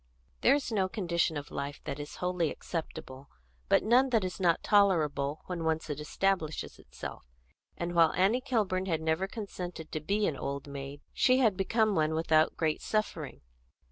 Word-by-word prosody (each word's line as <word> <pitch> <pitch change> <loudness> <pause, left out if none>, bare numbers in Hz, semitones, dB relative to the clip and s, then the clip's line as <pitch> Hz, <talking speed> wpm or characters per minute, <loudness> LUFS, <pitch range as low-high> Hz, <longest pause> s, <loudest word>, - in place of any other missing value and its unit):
There 265 - +6
is 280 -4 -2
no 195 -4 +1
condition 170 -5 0
of 145 - -7
life 140 +1 -4
that 145 - -5
is 145 0 -7
wholly 180 -3 0
acceptable, 140 -5 -6 0.4
but - - +4
none 250 +5 +4
that 225 -5 +2
is 185 +1 -4
not 175 -3 +2
tolerable 155 -8 +2
when 175 -2 -4
once 160 -1 -1
it 145 - -4
establishes 160 +1 -1
itself; - - -8 0.5
and 170 0 -3
while 165 -2 +5
Annie 200 +8 +3
Kilburn 205 -8 0
had 165 -4 0
never 160 +4 +1
consented 180 -6 -7
to 155 - -2
be 200 +7 0
an 155 - 0
old 140 +1 -4
maid, 140 0 -7
she 255 0 +4
had 225 -7 +3
become 215 +3 +2
one 155 -2 +1
without 160 -1 +3
great 155 -2 0
suffering. 215 0 -2
170 Hz, 175 wpm, -30 LUFS, 155-200 Hz, 0.5 s, There